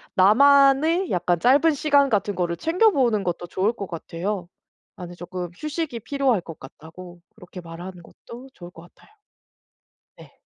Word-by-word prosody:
나만의 280 Hz, -, +4 dB
약간 175 Hz, -1 st, 0 dB
짧은 280 Hz, -, +4 dB
시간 285 Hz, -1 st, +2 dB
같은 205 Hz, -3 st, -1 dB
거를 175 Hz, -1 st, -2 dB
챙겨 365 Hz, -, +2 dB
보는 240 Hz, -, +1 dB
것도 175 Hz, -1 st, -4 dB
좋을 190 Hz, +5 st, 0 dB
것 200 Hz, -4 st, -7 dB
같아요. 175 Hz, +3 st, -5 dB, 0.5 s
"나는 175 Hz, -1 st, -9 dB
쪼끔 180 Hz, 0 st, -7 dB
휴식이 305 Hz, -4 st, -5 dB
필요할 265 Hz, -4 st, 0 dB
것 165 Hz, -2 st, -11 dB
같다."고 175 Hz, +6 st, -13 dB, 0.2 s
그렇게 180 Hz, -3 st, -12 dB
말하는 175 Hz, +1 st, -10 dB
것도 245 Hz, +9 st, -14 dB
좋을 175 Hz, -7 st, -12 dB
것 165 Hz, -, -14 dB
같아요. 430 Hz, -, -25 dB, 1.0 s
네. -, -, -17 dB
205 Hz, 310 characters per minute, -23 LUFS, 175-280 Hz, 1.0 s, 나만의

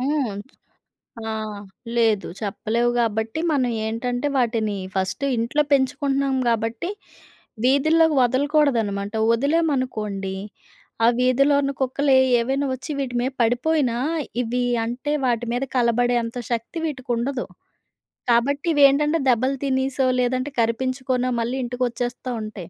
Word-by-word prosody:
హ్మ్. 265 Hz, -6 st, -1 dB, 0.9 s
ఆహ్, 215 Hz, -2 st, -4 dB, 0.4 s
లేదు 225 Hz, -4 st, +2 dB
చెప్పలేవు 225 Hz, +3 st, 0 dB
గాబట్టి 220 Hz, +3 st, -1 dB
మనం 255 Hz, -4 st, +1 dB
ఏంటంటే 245 Hz, +4 st, -2 dB
వాటిని 225 Hz, -4 st, 0 dB, 0.2 s
ఫస్ట్ 190 Hz, +6 st, -1 dB
ఇంట్లో 235 Hz, +7 st, +1 dB
పెంచుకుంటున్నాం 275 Hz, 0 st, +1 dB
గాబట్టి, 230 Hz, -, -1 dB, 0.7 s
వీధుల్లోకి 310 Hz, +4 st, +4 dB
వదలకూడదనమాట. 245 Hz, -6 st, +1 dB, 0.2 s
ఒదిలామనుకోండి 250 Hz, -9 st, -1 dB, 0.7 s
ఆ -, -, +7 dB
వీధిలో 265 Hz, +3 st, +3 dB
ఉన్న 275 Hz, -, -1 dB
కుక్కలు 275 Hz, +2 st, 0 dB
ఎ -, -, +6 dB, 0.2 s
ఏవైనా 270 Hz, +4 st, 0 dB
ఒచ్చి 260 Hz, +4 st, -6 dB
వీటి 265 Hz, -3 st, -3 dB
మీద 255 Hz, +3 st, -1 dB
పడిపోయినా, 245 Hz, +2 st, +1 dB, 0.5 s
ఇవి 245 Hz, +1 st, -1 dB, 0.2 s
అంటే 250 Hz, +6 st, -3 dB
వాటి 240 Hz, -1 st, 0 dB
మీద 245 Hz, +2 st, -1 dB
కలబడే 245 Hz, 0 st, +2 dB
అంత 230 Hz, +2 st, -7 dB
శక్తి 235 Hz, +7 st, -3 dB
వీటికుండదు. 260 Hz, -2 st, -2 dB, 0.9 s
కాబట్టి 280 Hz, +7 st, +1 dB
ఇవేంటంటే 290 Hz, +3 st, +4 dB
దెబ్బలు 255 Hz, +3 st, +2 dB
తినేసో, 265 Hz, 0 st, 0 dB
లేదంటే 255 Hz, +3 st, 0 dB
కరిపించుకోనో, 255 Hz, +2 st, -1 dB
మళ్ళీ 240 Hz, +3 st, -2 dB
ఇంటికొచ్చేస్తా 245 Hz, 0 st, -3 dB
ఉంటాయి. 210 Hz, -5 st, -8 dB
250 Hz, 110 wpm, -23 LUFS, 230-275 Hz, 0.9 s, ఆ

